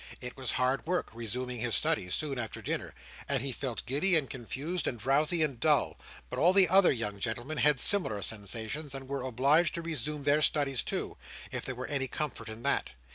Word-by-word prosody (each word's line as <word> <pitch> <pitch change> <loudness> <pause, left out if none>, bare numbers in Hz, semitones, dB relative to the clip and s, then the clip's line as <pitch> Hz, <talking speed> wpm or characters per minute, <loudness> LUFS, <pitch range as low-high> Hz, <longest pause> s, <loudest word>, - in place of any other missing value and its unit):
It 125 -1 -6
was 130 -2 -2
hard 130 +4 0
work, 180 +1 -1
resuming 120 +2 -4
his 115 -1 +2
studies, 90 0 +2
soon 140 -4 -3
after 115 -2 -4
dinner; - - -4 0.3
and 135 -3 +2
he 135 - -2
felt 125 -2 -4
giddy 160 +9 +2
and 150 -4 +4
confused 140 +7 -4
and 120 - -2
drowsy 150 +8 +2
and 140 -6 -3
dull. 150 -4 +2 0.3
But - - -3
all 175 +3 +5
the 195 -2 +7
other 190 +1 +6
young 105 -5 -3
gentlemen 120 +8 -3
had 150 -2 +4
similar 130 - +1
sensations, 110 +7 -2
and 135 -1 -6
were 140 0 -3
obliged 140 +7 +2
to 170 - -4
resume 150 -2 -4
their 145 +2 +3
studies 140 -3 +3
too, - - -4 0.3
if - - -4
there 130 - -4
were 130 +1 -5
any 135 -2 -1
comfort 150 -4 -4
in 110 +2 -9
that. - - 0
135 Hz, 200 wpm, -30 LUFS, 120-150 Hz, 0.3 s, the